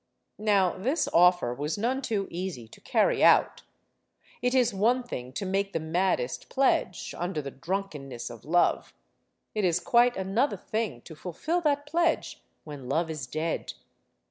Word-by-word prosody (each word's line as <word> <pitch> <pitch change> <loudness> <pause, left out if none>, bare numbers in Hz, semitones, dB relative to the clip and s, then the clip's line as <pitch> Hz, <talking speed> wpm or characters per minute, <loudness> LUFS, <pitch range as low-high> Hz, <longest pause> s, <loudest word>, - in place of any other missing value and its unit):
Now, 200 -4 +2
this 270 - 0
offer 175 -7 +5
was 145 +8 -3
none 250 +6 0
too 210 -6 -1
easy 175 -10 -5
to - - -16
carry - - +2
out. - - +5 0.8
It 250 +1 +1
is 250 -4 +3
one 235 +6 +2
thing 125 - -6
to 195 - -3
make 195 +1 -1
the 165 - 0
maddest 160 -5 -1
pledge, 260 -9 +1
under 175 -2 -3
the 140 -2 -5
drunkenness 150 -7 -5
of 115 -2 -11
love. 175 +3 +1 0.6
It 215 - -1
is 175 -1 +2
quite 240 +6 +3
another 195 +9 0
thing 215 - -3
to 160 - -11
fulfill 190 - -2
that 290 -2 +1
pledge 335 +3 0 0.2
when 145 -5 -9
love 160 +3 0
is 150 -5 -5
dead. 155 +5 -3
185 Hz, 155 wpm, -28 LUFS, 155-230 Hz, 0.8 s, offer